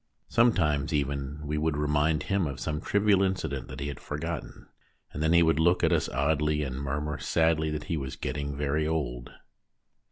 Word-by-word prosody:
Sometimes 85 - +2
even 70 0 -2
we 75 +1 -1
would 80 -1 0
remind 75 +1 +1
him 100 -4 0
of 70 -3 -5
some 75 +3 -3
trivial 100 -1 +3
incident 95 -9 -1
that 65 0 -8
he 70 - -3
had 70 - -5
THE - - -15
STORY 75 0 -5
TELLER 85 +1 -2
27 - - -11
forgotten, - - -19 0.4
and 75 - -4
then 80 +1 +3
he 85 0 +6
would 80 -1 +3
look 85 +3 +3
at 85 +1 +4
us 80 - +1
oddly 75 +2 +1
and 65 -1 -4
murmur 75 +2 -3
sadly 80 -1 +2
that 75 0 -3
he 80 - -2
was 65 -2 -4
getting 70 -1 -4
very 75 +2 0
old. 60 -7 -2
75 Hz, 210 wpm, -28 LUFS, 70-80 Hz, 0.4 s, he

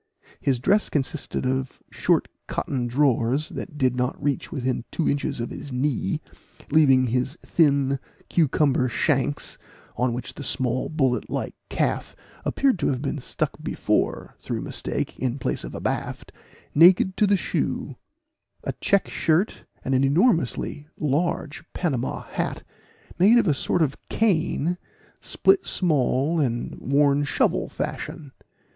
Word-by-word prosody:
His 135 -2 +1
dress 195 - +2
consisted 145 -1 -2
of 130 0 -2
short - - +2 0.2
cotton 125 -3 -2
drawers, 130 +1 +2
that 155 -6 -7
did 130 -3 +2
not 125 +1 -1
reach 145 -2 -1
within 130 -4 -1
two 165 - -1
inches 140 -3 0
of 115 - -3
his 140 - -7
knee, 125 -6 0 0.5
leaving 135 -4 +5
his 125 +4 -1
thin 140 -4 +3 0.3
cucumber 140 -5 +2
shanks 145 +2 0 0.4
(on 125 0 +1
which 125 +2 -5
the 145 - -8
small 130 -2 0
bullet 135 -6 0
like - - -3 0.2
calf - - -1 0.3
appeared 265 -9 +1
to 145 - +1
have 130 0 -1
been 145 +1 -2
stuck - - -3
before, - - -1
through - - -4
mistake, - - -4
in 130 +1 -1
place - - -2
of - - -7
abaft) - - -3 0.4
naked 180 +4 +6
to 210 - +4
the 200 0 +4
shoe; - - -2 0.7
a - - -2
check 200 -1 +3
shirt, 165 +6 0 0.2
and 135 - 0
an 130 +1 +3
enormously 150 - +1
large 155 +1 -1
Panama 135 -9 -2
hat, - - -3 0.6
made 210 +7 +7
of 235 - +4
a 155 - +3
sort 160 +4 +1
of 140 -3 -1
cane, 175 -4 +1 0.4
split 385 -1 +2
small, 150 -1 +2
and 120 -5 -1
worn 140 +1 +3
shovel 145 - +1
fashion. 150 -5 -5
140 Hz, 140 wpm, -24 LUFS, 130-160 Hz, 0.7 s, made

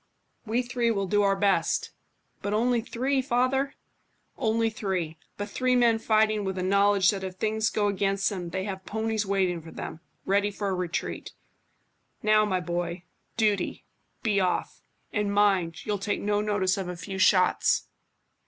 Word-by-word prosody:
"We 235 +3 +1
three 240 -1 0
will 200 -3 0
do 205 +2 +2
our 195 -1 +3
best." 195 0 +1 0.5
"But 205 +1 -1
only 240 +1 +2
three, 260 +4 0
father?" 260 +2 +1 0.6
"Only 225 0 +1
three, 180 -7 -3 0.2
but 205 - -3
three 255 +4 +1
men 235 -2 +4
fighting 215 -1 +2
with 190 -1 -3
a 185 - -1
knowledge 200 0 +4
that 195 -2 -5
if 185 -1 -5
things 220 +2 0
go 210 -1 0
against 195 -1 0
them 180 -3 -4
they 190 +3 -3
have 190 -1 -5
ponies 220 0 -2
waiting 185 -3 +1
for 160 - -11
them, 160 0 -7 0.3
ready 200 +1 +2
for 200 0 -3
a - - 0
retreat. 180 -2 -3 0.9
Now, 215 0 +4
my 190 -3 0
boy. 175 +1 -3 0.3
Duty. 215 -3 0 0.4
Be 210 -4 +2
off. 185 -1 -1 0.3
And 205 -1 0
mind, 195 -5 +2
you'll 210 -2 -1
take 205 +1 -1
no 205 0 0
notice 205 -3 +1
of 190 -2 -3
a 180 - -5
few 190 +2 -6
shots." 185 -1 +4
205 Hz, 165 wpm, -27 LUFS, 190-220 Hz, 0.9 s, men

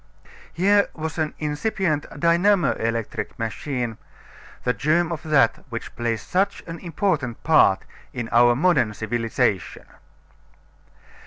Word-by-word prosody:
Here 200 +3 +3
was 160 0 -5
an 155 -1 -1
incipient 155 +1 -1
dynamo 175 +3 +3
electric 115 0 -3
machine 120 0 -3 0.6
the 125 - +1
germ 160 +4 +1
of 160 -2 -4
that 155 -4 +2
which 115 -1 -7
plays 115 -2 -2
such 195 +2 0
an 165 -1 -7
important 160 - -2
part 155 -12 +4 0.3
in 120 -2 -4
our 120 +1 +5
modern 130 -8 +2
civilization. 115 -3 -1
150 Hz, 110 wpm, -23 LUFS, 120-170 Hz, 0.6 s, our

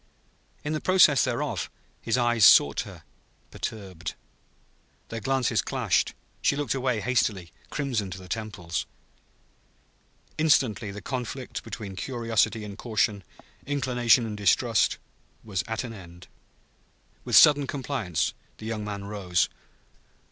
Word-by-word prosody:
In 150 - -2
the 155 - -2
process 180 -8 +5
thereof, 125 -3 -2 0.3
his 115 +2 0
eyes 120 -2 +2
sought - - +7
her, - - -13 0.5
perturbed. 95 -7 -6 0.9
Their 115 - -4
glances 130 +2 +1
clashed. - - 0 0.3
She - - +2
looked 145 0 -1
away 130 -4 0
hastily, 105 -8 0 0.2
crimson 125 -9 -2
to 95 - -6
her - - -11
temples. 105 -6 -4 1.5
Instantly 130 -10 +2
the 100 0 -8
conflict 125 0 -4
between 100 -4 -7
curiosity 115 -1 0
and 105 0 -8
caution, 110 -3 0 0.4
inclination 125 -4 +3
and 110 -2 -4
distrust, 105 +3 +2 0.5
was 100 -4 -2
at 110 +2 -2
an 120 -2 -6
end. 90 -3 -12 1.0
With - - 0
sudden 145 -2 +7
compliance, 130 - -2 0.2
the 110 - -10
young 110 -1 -3
man 100 -1 -5
rose. 100 -3 0
115 Hz, 120 wpm, -26 LUFS, 100-130 Hz, 1.5 s, sought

